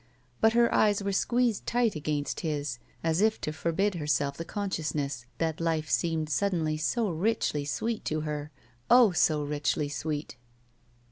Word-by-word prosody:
But 220 0 +4
her 235 0 +4
eyes 205 -1 +3
were 200 - -1
squeezed 235 +2 +1
tight 235 -4 +2
against 150 -1 -2
his, 145 -6 -3 0.2
as 165 +2 +1
if 220 0 +3
to 155 - -3
forbid 180 +6 0
herself 150 -3 0
the 165 - -5
consciousness 150 - -3
that 160 -1 -1
life 160 -2 -1
seemed 160 -2 +1
suddenly 160 -1 +1
so 200 +7 0
richly 165 -5 0
sweet 225 +10 -2
to 155 0 -1
her 150 -1 -4 0.2
— - - -33
oh, 240 -4 +7
so 155 -3 +2
richly 145 0 -1
sweet! 150 -1 -4
160 Hz, 155 wpm, -28 LUFS, 150-200 Hz, 0.2 s, oh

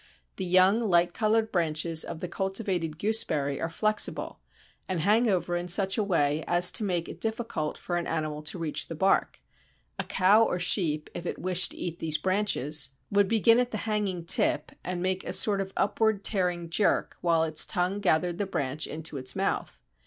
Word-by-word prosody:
The 190 - -3
young 185 +4 +4
light 175 -5 +2
coloured 220 0 0
branches 160 -1 0
of 165 -2 -8
the 180 - -3
cultivated 190 -4 -3
Gooseberry 155 -9 0
are 165 - -2
flexible, 215 +5 0 0.5
and 185 -2 -1
hang 220 +6 +3
over 180 -2 -1
in 175 0 -3
such 190 +2 +2
a 220 - 0
way 155 -5 0
as 175 +1 +5
to - - 0
make 175 -4 -2
it - - -10
difficult 220 -9 -3
for 175 - -4
an 170 - -3
animal 155 -2 -3
to 155 +4 -4
reach 165 -3 -2
the 165 - -7
bark: 190 +5 0 0.6
a - - 0
cow 200 +4 +3
or 180 - -1
sheep, 170 -4 +1
if 175 - -6
it - - -4
wished 180 0 +2
to - - -12
eat 170 -1 -5
these 155 -1 +1
branches, 185 -8 0 0.2
would 200 -1 +3
begin 230 +2 +4
at 250 -1 0
the 215 - -4
hanging 205 -6 -2
tip 170 - +2
and 180 0 -4
make 185 0 -1
a - - -5
sort 200 -2 +3
of 190 0 -6
upward 215 0 0
tearing 180 -4 0
jerk 205 +4 +1
while 165 -2 +2
its 155 -1 +3
tongue 180 +3 -1
gathered 175 -2 0
the 205 - -1
branch 145 -4 -3
into 155 -1 -6
its 130 -1 -1
mouth. - - -3
180 Hz, 190 wpm, -27 LUFS, 165-200 Hz, 0.6 s, as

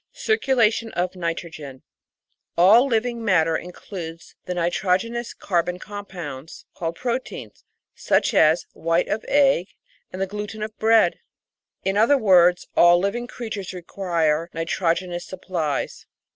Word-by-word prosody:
Circulation 235 - +1
of 180 +1 -2
Nitrogen 165 -6 -5 0.7
All 215 +9 +6
living 235 -1 -1
matter 165 -6 +3
includes 170 -2 -8
the 180 - -4
nitrogenous 185 +7 -1
carbon 180 -1 -1
compounds 175 -8 -8
called 165 -1 -4
proteins, 250 +4 -5 0.3
such - - +1
as 160 -3 +4
white 165 +2 0
of 215 - -2
egg 275 -10 +3 0.4
and 185 - -7
the 195 - +1
gluten 210 +2 -6
of 215 0 -6
bread. 225 0 +4 0.6
In 195 +1 0
other 235 +7 +5
words, 180 -6 +4
all 175 0 +6
living 200 +7 -2
creatures 215 -7 -6
require 170 -3 -1
nitrogenous 175 +1 -1
supplies. 175 -6 -4
185 Hz, 115 wpm, -23 LUFS, 170-220 Hz, 0.7 s, All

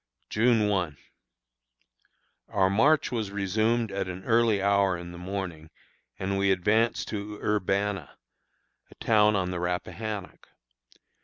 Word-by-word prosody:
June 115 -1 +3
1. 90 -8 -1 1.5
Our 95 -1 +2
march 145 +9 +3
was 110 -4 -2
resumed 110 +3 0
at 95 -1 -2
an 90 0 -6
early 115 -3 +3
hour 100 -2 +2
in 85 0 -8
the 85 - -10
morning, 90 -4 -5 0.5
and 95 +1 -2
we 100 0 +2
advanced 105 +5 +1
to 105 0 -5
Urbanna, 100 -4 -1 0.8
a - - -17
town 105 -1 +3
on 90 -2 0
the 90 - -3
Rappahannock. 90 +3 -4
100 Hz, 125 wpm, -27 LUFS, 95-110 Hz, 1.5 s, June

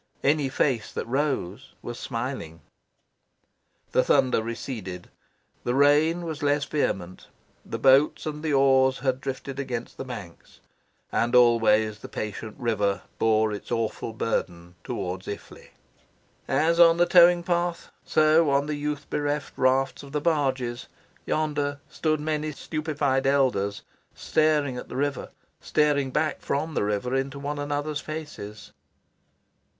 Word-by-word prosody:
Any 145 -1 +2
face 125 -4 0
that - - -3
rose 130 -4 -2
was 120 0 -6
smiling. 115 - -5 1.3
The 130 - +3
thunder 130 -5 +3
receded; 110 -6 -6 0.5
the 120 - 0
rain 150 +5 +4
was 160 -2 -5
less 145 0 +1
vehement: 95 - -2 0.4
the 115 - -5
boats 135 +5 +4
and 150 -1 -4
the 155 -1 -1
oars 135 -1 +4
had 130 -1 -1
drifted 135 0 -5
against 125 -4 -4
the - - -4
banks. 100 -10 -10 0.5
And 120 +1 +1
always 110 -3 +4
the - - -10
patient 110 +1 -5
river 105 -4 0 0.2
bore 110 -1 +2
its 105 - -8
awful 115 0 -2
burden 90 -6 -3
towards 90 +1 -4
Iffley. 100 - -8 0.8
As 165 +2 +2
on 165 -1 +7
the 175 - +5
towing 175 0 +6
path, 175 0 -1
so 155 0 +4
on 140 0 +2
the 150 - -3
youth 150 0 -3
bereft 145 -1 -2
rafts 130 +1 +1
of 140 0 -12
the 150 - +1
barges, 130 -6 -1 0.4
yonder, 145 -2 -1
stood 155 -1 0
many 155 0 -2
stupefied 145 -3 -1
elders, 125 -8 +1 0.3
staring 150 -4 +1
at - - -8
the - - -7
river, 140 0 -2 0.3
staring 145 -3 +1
back 155 +3 0
from 155 +3 -2
the - - 0
river 105 +5 -1
into 135 +1 -1
one 145 +1 -4
another's 145 +1 -2
faces. 150 -10 -8
135 Hz, 135 wpm, -26 LUFS, 115-150 Hz, 1.3 s, on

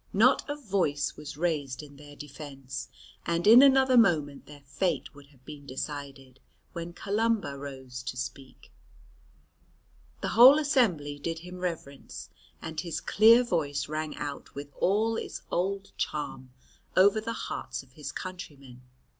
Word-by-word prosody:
Not 230 +7 +4
a 290 - -1
voice 190 - -1
was 150 -1 -9
raised 150 -5 -2
in 145 -1 -13
their 145 0 -13
defence, 135 -3 -8 0.4
and 170 0 -1
in 230 +4 +9
another 265 -2 +5
moment 150 -10 +1
their 145 -1 -13
fate 175 +6 -2
would 140 -1 -15
have 135 -3 -25
been 145 -2 -10
decided, 135 -1 -7 0.3
when 170 0 -6
Columba 210 -3 -1
rose 130 -3 -8
to 125 - -5
speak. 130 +1 -8 1.5
The - - -2
whole 255 +6 +8
assembly 210 - +1
did 165 +3 -3
him 180 0 -9
reverence, 165 -6 -6 0.3
and 160 -1 -5
his 170 -3 -4
clear 230 +4 +6
voice 145 - -1
rang 155 0 -4
out 145 -1 -6
with 145 +1 -7
all 220 +4 +2
its - - -6
old 195 +3 -2
charm 130 -4 -4 0.5
over 200 +3 +5
the 230 +1 -4
hearts - - -5
of 130 - -23
his 145 +1 -7
countrymen. 140 -9 -9
155 Hz, 145 wpm, -28 LUFS, 140-200 Hz, 1.5 s, in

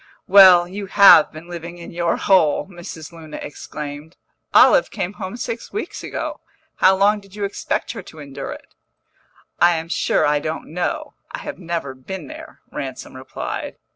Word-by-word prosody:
"Well, 185 -3 +8
you 195 +2 -6
have 185 -5 +7
been 155 +2 -11
living 170 0 -8
in 170 - -10
your 170 0 0
hole!" 175 -7 +3
Mrs. 175 -3 -9
Luna 160 -2 -10
exclaimed. 150 +2 -8 0.3
"Olive - - +6
came 190 -2 -4
home 190 +3 -7
six 235 -1 -5
weeks 425 - -5
ago. - - -5 0.4
How 190 +1 +5
long 205 +2 +3
did 195 -1 -17
you 210 - -4
expect 200 0 -2
her 225 - -7
to 160 - -15
endure 140 -2 -7
it?" - - -11 0.9
"I 175 0 +5
am 165 +1 -5
sure - - +1
I 145 0 +2
don't 155 +1 -5
know; 305 - -3 0.2
I - - -5
have - - -7
never 170 -6 -4
been 150 +7 -8
there," - - -11
Ransom 130 -1 -7
replied. 130 0 -6
175 Hz, 170 wpm, -21 LUFS, 155-195 Hz, 0.9 s, Well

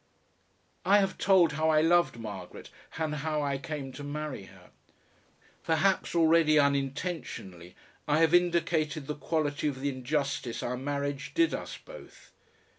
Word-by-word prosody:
I 195 +3 +5
have 195 -2 0
told 185 -4 +4
how 155 +1 0
I 155 -1 +4
loved 170 -4 +3
Margaret 100 -5 -8 0.3
and 160 -1 -1
how 150 +1 -1
I 140 -1 -1
came 145 -3 -5
to 145 - -9
marry 145 -6 -5
her. - - -18 0.9
Perhaps 175 +3 +1
already 160 -2 +4
unintentionally 140 - -2 0.3
I 150 0 +3
have 165 0 +4
indicated 165 -4 +1
the 150 - -3
quality 150 -1 -1
of 135 -3 -3
the 140 +1 -1
injustice 135 -2 -2
our 125 - -2
marriage 140 +1 -4
did 335 0 +3
us - - -5
both. - - -14
150 Hz, 140 wpm, -29 LUFS, 140-165 Hz, 0.9 s, I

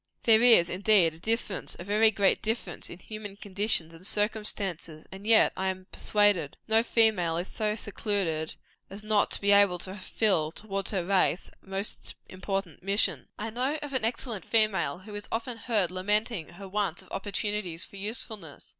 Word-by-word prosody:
There 225 -1 +6
is, 230 -8 +7
indeed, 185 -2 +3
a 160 - -15
difference, 220 0 -2
a - - -7
very 210 +3 +4
great 200 -2 +2
difference, 220 -6 -3
in 170 - -9
human 210 +1 -8
conditions 200 -4 0
and 165 +2 -14
circumstances; 200 -6 -2
and 195 +2 -9
yet 225 -1 +6
I 190 - -2
am 185 0 -3
persuaded, 205 -8 +2
no 220 0 +4
female 215 -8 +2
is 175 +2 -3
so 215 -1 -2
secluded 195 -7 -2 0.3
as 200 +2 -9
not 215 -1 +2
to - - -1
be 200 0 +3
able 200 -3 +5
to 185 +2 -6
fulfil, 190 -5 +1
towards 195 +1 -3
her 185 -4 -1
race, 190 -1 +1
a - - -24
most 195 +2 -2
important 190 -3 -4
mission. 200 +3 +1
I 220 +1 -4
know 255 +6 -1
of 290 -1 -7
an 260 -4 0
excellent 230 -2 -2
female 215 -5 +1
who 205 +3 -12
is 205 0 -6
often 230 +1 -3
heard 210 -6 +1
lamenting 205 0 0
her 195 +2 -10
want 190 -3 -2
of - - -20
opportunity 205 -3 -2
for 190 +3 -4
usefulness. 205 - -3
200 Hz, 175 wpm, -28 LUFS, 185-215 Hz, 0.3 s, is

